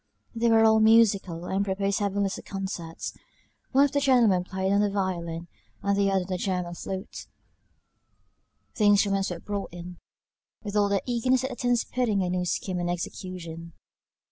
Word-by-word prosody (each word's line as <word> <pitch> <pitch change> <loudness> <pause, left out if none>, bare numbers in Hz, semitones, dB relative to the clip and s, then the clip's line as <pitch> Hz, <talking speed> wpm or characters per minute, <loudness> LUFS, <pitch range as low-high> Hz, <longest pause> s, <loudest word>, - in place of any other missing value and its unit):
They 235 0 +1
were 225 0 +5
all 220 0 +5
musical, 205 -6 +4
and 195 +2 0
proposed 195 0 -1
having 200 0 0
little 195 -1 -2
concerts. 190 -4 -5 0.6
One 275 +1 +5
of 285 - -2
the 285 - +1
gentlemen 240 -10 +4
played 190 +1 -1
on 200 - +3
the 205 - +2
violin, 175 -4 -3 0.4
and 200 0 +2
the 200 0 +2
other 195 -1 +2
on - - -5
the 185 -1 -2
german 180 -3 -2
flute. 190 +2 -6 1.5
The 215 - +2
instruments 200 -1 +3
were 175 - -4
brought 205 +1 -5
in, 175 0 -9 0.6
with 205 -1 -5
all 205 -1 +3
the 200 -1 0
eagerness 250 +1 +1
that 265 - -2
attends 245 -1 0
putting 220 -6 0
a 180 - -1
new 180 0 -1
scheme 180 +1 -2
in 175 0 -2
execution. 170 -1 -6
195 Hz, 170 wpm, -26 LUFS, 180-220 Hz, 1.5 s, were